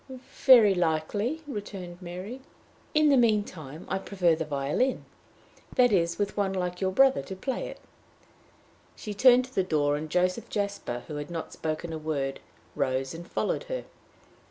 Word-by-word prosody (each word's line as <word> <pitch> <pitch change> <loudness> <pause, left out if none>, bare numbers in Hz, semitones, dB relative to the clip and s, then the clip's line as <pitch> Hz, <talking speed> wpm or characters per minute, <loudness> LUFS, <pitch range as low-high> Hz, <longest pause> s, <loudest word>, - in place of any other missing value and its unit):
"Very 235 -7 +8
likely," 190 - -1
returned 195 -7 -7
Mary. 185 +9 -7 0.5
"In 305 0 +5
the 275 - +5
mean 220 -4 +4
time 155 -4 -10
I 190 - -1
prefer 185 -3 +1
the 160 0 -2
violin 150 - -1 0.7
that 245 -2 +5
is, 170 -3 +2
with 205 0 -1
one 200 -2 0
like 180 -1 -3
your 190 - +2
brother 265 - +4
to 140 +8 -7
play 245 +7 -3
it." - - -9 1.2
She 210 - -6
turned 250 +4 +6
to 260 - -17
the - - +2
door, 150 -5 +1
and 155 +1 -6
Joseph 180 +6 0
Jasper, 200 - -3
who 150 - -5
had 145 +1 -5
not 165 -2 -5
spoken 160 +1 -4
a 160 - -4
word, 140 -3 -2 0.3
rose 130 0 -1
and 170 +2 -9
followed - - -1
her. - - -4
185 Hz, 165 wpm, -28 LUFS, 155-215 Hz, 1.2 s, Very